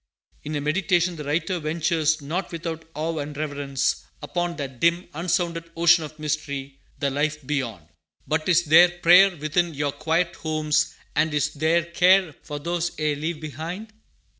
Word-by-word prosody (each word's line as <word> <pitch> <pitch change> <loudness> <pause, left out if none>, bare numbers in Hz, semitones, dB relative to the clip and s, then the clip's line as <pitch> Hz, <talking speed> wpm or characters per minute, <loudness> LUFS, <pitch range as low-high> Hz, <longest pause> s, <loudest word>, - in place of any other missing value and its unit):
In 150 +1 -5
A 145 - -1
Meditation, 175 +3 +1
the 150 - -6
writer 165 +5 -1
ventures, 160 0 0
not 170 +7 -3
without 165 -1 -5
awe 160 +1 -2
and 145 0 -5
reverence, 145 -3 -1 0.2
upon 175 -1 -2
that 135 -5 -6
dim, 170 +2 +2
unsounded 170 0 -1
ocean 170 0 +5
of 155 0 -9
mystery, 140 -3 -4 0.2
the 140 -2 -1
life 150 +1 -1
beyond: 125 - -3 0.4
"But 155 +2 -1
is 175 -1 +4
there 170 +3 +7
prayer 175 +2 +5
Within 160 +2 0
your 145 0 -1
quiet 165 +4 -1
homes, 155 -1 0 0.2
and 160 0 +2
is 150 0 0
there 160 +3 +2
care 180 0 +3
For 145 - -6
those 170 +3 -2
ye 155 -1 +1
leave 155 +2 -3
behind? 165 - -7
160 Hz, 160 wpm, -24 LUFS, 150-170 Hz, 0.4 s, there